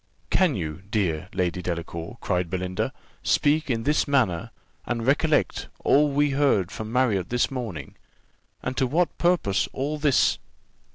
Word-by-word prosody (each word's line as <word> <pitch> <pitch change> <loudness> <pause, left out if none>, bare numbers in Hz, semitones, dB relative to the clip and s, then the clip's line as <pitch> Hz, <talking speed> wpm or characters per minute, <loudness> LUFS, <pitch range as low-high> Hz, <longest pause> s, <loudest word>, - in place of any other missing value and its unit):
"Can 180 -7 +3
you, 80 -2 -4
dear 90 -5 -1
Lady 90 -1 -1
Delacour," 85 -1 -5
cried 90 -1 -1
Belinda, 90 0 -2 0.3
"speak 150 +1 +2
in 115 -3 0
this 150 +4 +2
manner, 115 -13 +1 0.3
and 115 -2 -3
recollect 150 +3 +2 0.2
all 150 +1 +5
we 145 +1 +2
heard 135 -10 +2
from 110 +1 -6
Marriott 115 -8 +1
this 125 +2 +1
morning? 110 - -5 0.7
And 130 - -3
to 130 - +2
what 165 +7 +1
purpose 170 - +2
all 145 +3 -2
this?" 145 -3 +3
120 Hz, 145 wpm, -25 LUFS, 90-145 Hz, 0.7 s, all